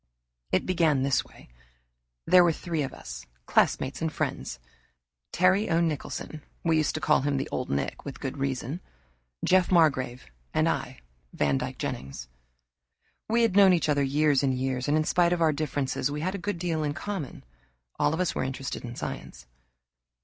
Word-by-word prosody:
It 95 - +2
began 160 -7 +2
this 135 -2 +2
way. 125 - -17 0.8
There 180 -1 +7
were 170 - +4
three 165 0 -3
of 135 - -2
us, - - -9 0.2
classmates 130 +3 +1
and 160 -1 0
friends - - -3 0.7
Terry 185 +4 +3
O. 165 - +3
Nicholson 155 -1 -3 0.2
(we 165 -1 +3
used 155 -2 +1
to - - -1
call 150 - +3
him 140 0 0
the 135 - -2
Old 125 - -3
Nick, 70 - -2
with 140 - -7
good 135 0 -4
reason), 135 +4 -2 0.6
Jeff 185 0 +3
Margrave, 140 -8 +2 0.3
and - - +3
I, - - -2 0.3
Vandyck 70 -2 0
Jennings. 65 -2 -5 1.0
We 235 +1 +3
had 225 -5 +2
known 195 -2 +7
each 165 -3 +1
other 145 -1 +3
years 145 0 +3
and 135 -2 +1
years, 130 0 -2
and 150 +2 +3
in 155 - +2
spite 175 +2 +3
of 175 - -1
our 155 -1 +4
differences 145 -2 -1
we 150 +1 -4
had 185 +4 -1
a 200 - -4
good 205 +1 -3
deal 165 -2 -1
in 145 -1 -2
common. 190 -6 -5 0.6
All - - +3
of 160 - -2
us 185 -3 +1
were - - -1
interested 135 0 -4
in 120 -1 -7
science. - - -6
150 Hz, 180 wpm, -27 LUFS, 130-170 Hz, 1.0 s, There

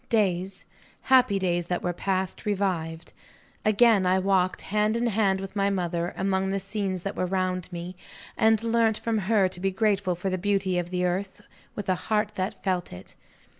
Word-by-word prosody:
Days, 195 -3 0 0.4
happy 255 -6 +4
days 175 -2 0
that 180 0 -2
were 175 - -1
past, 190 +1 -2
revived. 175 -5 -2 0.5
Again, 215 -1 +4
I 185 +1 +3
walked 190 -1 +1
hand 210 +2 +1
in 235 - 0
hand 200 -4 +2
with 195 +1 -7
my 200 0 +2
mother, 175 -3 -1
among 190 0 0
the 195 0 -1
scenes 195 -2 -3
that 195 - -4
were 185 - -1
round 185 -1 -2
me, 175 +1 -6 0.4
and 220 0 +3
learnt 230 -1 +2
from 225 -2 -1
her 200 -1 +3
to 180 - -6
be 195 +1 +1
grateful 195 -2 +1
for 185 +2 -3
the 185 - -1
beauty 195 -2 +1
of 175 0 -4
the 180 0 -1
earth, 190 +2 -2 0.3
with 205 - -5
a 185 - +3 0.2
heart 210 -1 +1
that 190 0 -4
felt 185 -3 -1
it. 90 +1 -10
190 Hz, 185 wpm, -26 LUFS, 180-210 Hz, 0.5 s, happy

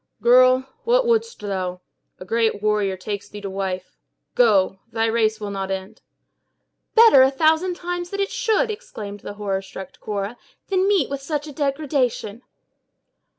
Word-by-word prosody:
"Girl, 255 +1 +5 0.2
what - - +3
wouldst 460 0 +1
thou? 185 -3 -3 0.4
A 185 - -9
great 220 0 0
warrior 210 -3 +1
takes 200 +1 -5
thee 210 - -8
to 195 -1 -5
wife. 190 -1 -4 0.3
Go! 195 -5 +3
thy 225 0 0
race 220 -1 +1
will 205 -1 -5
not 195 -1 -4
end." 190 0 -5 0.9
"Better, 445 - +8
a 260 - +6
thousand 320 +6 +2
times, 350 0 -4
it 395 0 -2
should," 475 -2 +1
exclaimed 205 - -8
the 205 - -8
horror 200 -2 -2
struck 190 -1 -10
Cora, 205 +2 -4 0.3
"than 380 0 +2
meet 390 -9 +3
with 280 -1 -3
such 295 +1 -3
a 300 - -8
degradation!" 275 -6 -1
230 Hz, 150 wpm, -22 LUFS, 200-320 Hz, 0.9 s, Better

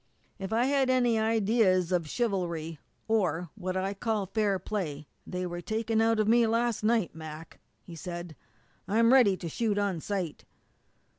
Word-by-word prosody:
"If 195 +1 -5
I 230 +3 +2
had 270 -1 +2
any 245 -3 +3
ideas 215 -5 +2
of 170 -4 0
chivalry, 170 - -2 0.3
or 180 -7 0
what 185 -2 -4
I 190 +1 -1
call 215 0 -1
fair 200 0 0
play, 165 -7 -4 0.2
they 180 0 -3
were 175 0 -5
taken 220 +2 0
out 225 0 +2
of 215 - +2
me 230 +1 +5
last 230 -1 0
night, 220 -5 +2
Mac," 160 0 -9 0.2
he 170 - -10
said. 175 -1 -7 0.5
"I'm 230 +4 +4
ready 220 -8 +5
to 175 - -6
shoot 210 +5 -1
on 200 -5 0
sight!" 185 -6 -3
200 Hz, 160 wpm, -29 LUFS, 175-225 Hz, 0.5 s, me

